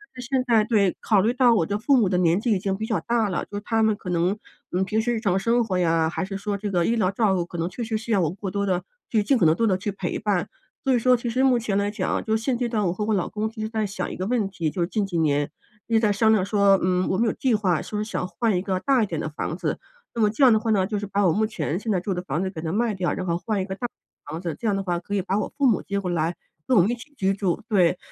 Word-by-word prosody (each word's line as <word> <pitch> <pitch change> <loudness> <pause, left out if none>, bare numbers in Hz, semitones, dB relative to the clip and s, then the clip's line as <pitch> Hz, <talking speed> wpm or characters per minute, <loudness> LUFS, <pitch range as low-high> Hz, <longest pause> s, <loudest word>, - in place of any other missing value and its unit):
但 250 - -7
是 - - -8
现 265 -2 +1
在 225 -3 +4
对， 205 -6 +2
考 205 -4 +3
虑 225 +4 +2
到 250 -2 +4
我 170 - +2
的 200 +4 -2
父 270 +5 +3
母 220 -6 +3
的 180 - +1
年 170 +2 +3
纪 235 - 0
已 200 - +2
经 195 0 -2
比 220 - -3
较 - - 0
大 230 -3 0
了， 180 - -2
就 205 - -6
他 225 +1 +1
们 220 -1 +3
可 200 -3 -8
能， 180 +4 +1 0.3
嗯， 185 +2 0
平 220 +3 0
时 240 +1 0
日 225 - -1
常 195 -4 +1
生 235 +4 +2
活 185 -4 -1
呀， 165 -2 +2
还 175 - -3
是 195 0 -5
说 205 +1 -3
这 205 +1 -4
个 175 -2 +2
医 230 - +2
疗 205 -5 +2
照 200 -2 +2
顾 175 -2 -1
可 175 - -8
能 165 0 -1
确 235 +6 -5
实 220 -1 -1
需 230 +1 -6
要 200 - +3
我 160 - +1
过 190 +1 -6
多 200 0 -1
地 185 -2 0 0.3
去 220 -3 +2
尽 255 +6 +3
可 185 - +3
能 160 0 +5
多 230 - +1
地 190 - +3
去 205 +2 -3
陪 195 - -4
伴。 205 -4 0 0.3
所 270 - +2
以 245 - +3
说 250 +2 +4
其 235 0 -4
实 255 +3 +1
目 260 -2 +4
前 215 -4 -1
来 200 0 +1
讲， 205 -3 -2
就 220 0 +1
是 220 - -8
现 255 -1 0
阶 240 -1 -1
段 215 -3 0
我 170 - 0
和 210 - -3
我 220 - +1
老 190 -4 0
公 215 +1 -2
一 220 -1 -9
直 215 - -1
在 220 -1 -1
想 185 -2 -4
一 - - -6
个 185 - -3
问 225 -4 +1
题， 170 -5 -2
就 180 - -3
是 170 - +1
近 210 +1 -1
几 185 -3 -3
年 145 -2 +1 0.4
一 230 - 0
直 - - +6
在 215 -2 +3
商 220 +2 +3
量 195 -4 +2
说， 200 -1 +4
嗯， 180 0 +1
我 190 - +1
们 230 +3 +2
有 215 - +1
计 255 -4 +1
划 185 -6 +1
说 210 0 -3
想 215 -4 -3
换 225 +1 0
一 180 - -1
个 190 -2 -1
大 270 +1 +2
一 - - +2
点 165 -4 -3
的 - - -3
房 155 +2 -4
子。 - - -2 0.4
那 230 - 0
么 210 - +4
这 220 +6 0
样 250 -3 +8
的 220 - +3
话 225 +1 -3
呢， 195 -3 +3
就 210 -1 -2
是 205 - -5
把 200 +1 +1
我 165 - +3
目 215 +4 +1
前 170 -4 -3
现 220 - -3
在 190 - +2
住 190 +2 -2
的 180 - -3
房 155 0 -2
子 190 - -1
给 160 -4 -7
它 160 - -3
卖 225 +3 +1
掉， 180 -2 -1
然 185 - -4
后 170 -1 0
换 205 +1 -2
一 - - -2
个 190 - -5
大 245 +4 -3 0.4
房 160 - -4
子， 170 -4 -3
这 230 - -2
样 205 - +2
的 195 - -2
话 175 -2 -1
可 200 +4 -5
以 200 - +1
把 195 +2 0
我 - - -3
父 285 - +2
母 230 - +2
接 200 0 -3
过 180 -3 -3
来 165 +1 0 0.3
跟 255 - +4
我 - - +8
们 205 - +1
一 - - -1
起 250 +5 -14
居 195 -2 +1
住， 190 -4 -1
对。 180 -4 +3
200 Hz, 360 characters per minute, -24 LUFS, 185-225 Hz, 0.4 s, 样